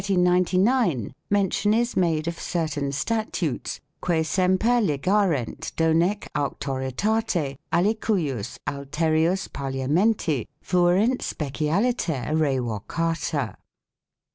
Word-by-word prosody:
5 - - -7
In 180 -2 +3
1399 180 - +2 0.2
mention 205 +1 +2
is 240 +1 0
made 165 -3 +1
of 170 0 -3
certain 155 -5 -2
statutes 220 +10 -2 0.2
"que 165 -3 +2
semper 190 +8 +2
ligarent 170 - 0
donee 165 +5 +2
auctoritate 140 - -1
alicujus 170 - 0
alterius 160 +6 0
Parliamenti 140 - 0
fuerint 180 +8 +2
specialiter 155 - -1
revocata." 145 - -1
165 Hz, 85 wpm, -25 LUFS, 140-200 Hz, 0.2 s, In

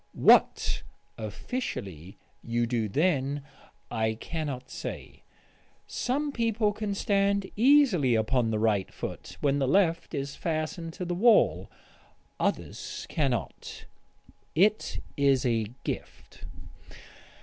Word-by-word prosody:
What - - +4 0.4
officially 100 - -5 0.3
you 120 0 0
do 115 -3 -1
then, 145 - +1 0.5
I 110 -1 0
cannot 140 -1 -5
say.... - - -7 0.6
Some 285 +4 -1
people 225 -4 +1
can 210 -1 -3
stand 200 -1 +1
easily 225 - +5
upon 115 +2 +1
the 110 - 0
right 105 -3 +1
foot - - -7
when 140 0 +2
the 135 - +1
left 170 0 +2
is 140 0 -3
fastened 165 +1 -3
to 180 - -5
the 175 - -2
wall... 220 +6 +4 0.7
others - - -3
cannot.... 135 - -2 0.7
It 205 +6 +2
is 135 -2 +3
a 115 -3 +1 0.2
gift.... - - -7
145 Hz, 105 wpm, -28 LUFS, 120-200 Hz, 0.7 s, easily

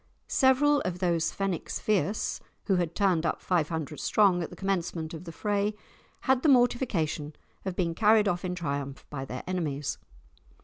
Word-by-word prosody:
Several 280 +2 +4
of 180 -1 -2
those 170 -3 +1
"Fenwicks 195 -4 -3
fierce," 210 0 0 0.3
who 195 -3 +2
had 170 -2 -1
turned 185 -5 +2
up 165 - 0
five 170 -4 0
hundred 160 -2 -4
strong 195 -4 +3
at 165 - -4
the - - -10
commencement 175 -4 -2
of 165 +2 -8
the 165 - -6
fray, 205 +5 -1 0.5
had 265 -1 +2
the 305 - +3
mortification 225 - +2 0.3
of 190 -2 -3
being 170 -3 0
carried 210 +2 +4
off 175 -1 0
in 180 -1 -2
triumph 140 -5 -4
by 135 -2 -4
their 130 -1 -6
enemies. 150 -6 -2
180 Hz, 170 wpm, -28 LUFS, 160-205 Hz, 0.5 s, Several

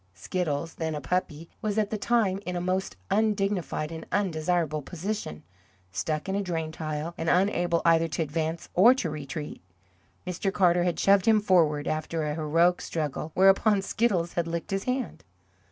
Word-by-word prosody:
Skiddles, 160 - -3
then 160 -1 -2
a - - -3
puppy, 165 +1 -2
was 215 -1 -2
at 210 -2 +1
the 215 - -1
time 210 -5 +1
in 180 -1 -4
a - - -1
most 185 - -2 0.2
undignified 200 -7 0
and 160 0 -6
undesirable 165 -4 0
position, 175 - -5 0.5
stuck 150 - -2
in 190 - -1
a 200 - 0
drain 165 -4 -3
tile, 155 +1 -4
and 165 - -1
unable 175 -2 +2
either 165 0 +4
to 165 +1 -1
advance 160 +2 -3
or 230 +8 +7
to 175 -11 -2
retreat. 150 0 -6 0.6
Mr. 185 +2 -2
Carter 180 -2 +3
had 175 - -1
shoved 195 0 +4
him 220 -1 +6
forward, 165 -7 +2
after 155 +1 -2
a 150 -1 -1
heroic 165 +3 +2
struggle, 155 0 -3
whereupon 195 +2 +5
Skiddles 195 -7 0
had 170 -1 -1
licked 170 +3 -4
his 195 0 -2
hand. 255 -1 -3
170 Hz, 170 wpm, -27 LUFS, 155-195 Hz, 0.6 s, or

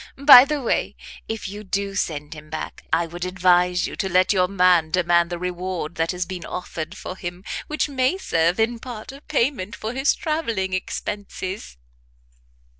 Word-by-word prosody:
By 275 -2 +10
the 295 -1 -2
way, - - 0 0.3
if 225 -2 -4
you 205 +2 -7
do 200 0 -2
send 150 -6 -3
him 155 -1 -12
back, 155 0 -6
I 165 +2 +2
would 175 +2 -7
advise 180 -1 +3
you - - -5
to 190 - -1
let 185 +2 +3
your 185 -2 +3
man 180 -4 +3
demand 170 0 +2
the 175 - -3
reward 180 -2 -4
that 165 0 -1
has 180 -1 -2
been 180 0 -6
offered 170 -2 -6
for 185 - -6
him, 175 0 -7 0.2
which 305 +1 0
may 265 +4 +1
serve 170 - +1
in 230 +1 +1
part 235 -2 -8
of 275 +2 -14
payment 235 -8 0
for 220 +2 -5
his 270 +3 +2
travelling 230 - -2
expenses." 190 - -5
185 Hz, 175 wpm, -23 LUFS, 175-225 Hz, 0.3 s, By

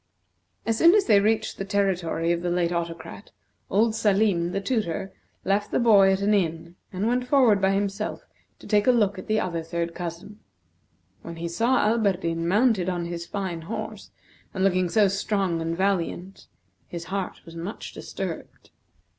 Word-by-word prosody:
As 225 -1 0
soon 340 +4 +7
as 415 - +3
they 210 -4 +5
reached 220 +2 0
the - - -1
territory 185 -4 0
of 170 0 0
the 175 - -2
late 175 -1 0
Autocrat, 170 +3 -5 0.4
old 220 +3 +2
Salim, 200 -5 +2
the 195 - -1
tutor, 195 -4 -2 0.3
left 200 +2 +1
the - - 0
boy 205 -5 +5
at 190 0 0
an 205 +1 +2
inn, 170 -3 -1 0.2
and 190 +2 -2
went 250 +1 0
forward 250 -8 +4
by 190 - +3
himself 200 +1 -2 0.3
to - - -16
take 210 0 +2
a - - +8
look 205 -5 +1
at - - -10
the 215 0 +2
other 170 -4 -2
third 170 +1 -3
cousin. 175 +5 -7 0.8
When 170 - -8
he 170 +1 -4
saw 230 +10 +1
Alberdin 185 -7 0
mounted 205 -1 +2
on 175 -2 -2
his 170 0 -5
fine 185 -4 -4
horse, 215 +3 -6 0.5
and 190 - 0
looking 185 -2 +2
so 210 +2 +4
strong 195 -3 -1
and 165 +1 -2
valiant, 190 -1 -2 0.4
his 170 -1 -6
heart 195 -2 -3
was 165 - -12
much 170 +6 -7
disturbed. - - -7
195 Hz, 170 wpm, -25 LUFS, 170-210 Hz, 0.8 s, a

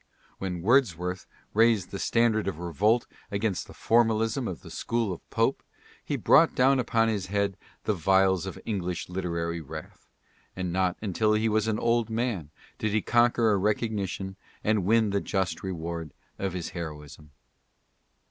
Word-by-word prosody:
When 90 -3 -4
Wordsworth 90 - +2 0.3
raised 110 -4 +3
the 100 - -5
standard 115 -3 +2
of 95 - -2
revolt 95 - +1 0.2
against 100 -1 -1
the - - -12
formalism 115 +1 +2
of 90 - -5
the 85 - -11
school 115 +3 -1
of 85 - -12
Pope, - - +1 0.4
he - - -2
brought - - +5
down 130 +1 +4
upon 115 -2 +2
his 105 -4 -1
head 100 0 0 0.3
the 105 - +1
vials 95 0 +3
of 95 - -6
English 90 -6 -3
literary 85 -2 -2
wrath, 75 - -10 0.5
and 90 -2 -3
not 90 -1 +1
until 105 +2 +1
he 110 +1 +2
was 110 0 +1
an 110 -1 +1
old 115 -1 +1
man 110 - -2 0.3
did 110 -1 -1
he 110 - +1
conquer 120 -1 +3
a 100 - +3
recognition 100 -2 -1 0.3
and 105 -4 +1
win 110 0 +3
the 100 0 +1
just 95 -4 -1
reward 85 -4 -5 0.2
of 95 -2 -2
his 90 -2 -4
heroism. 75 -2 -8
100 Hz, 155 wpm, -27 LUFS, 90-110 Hz, 0.5 s, brought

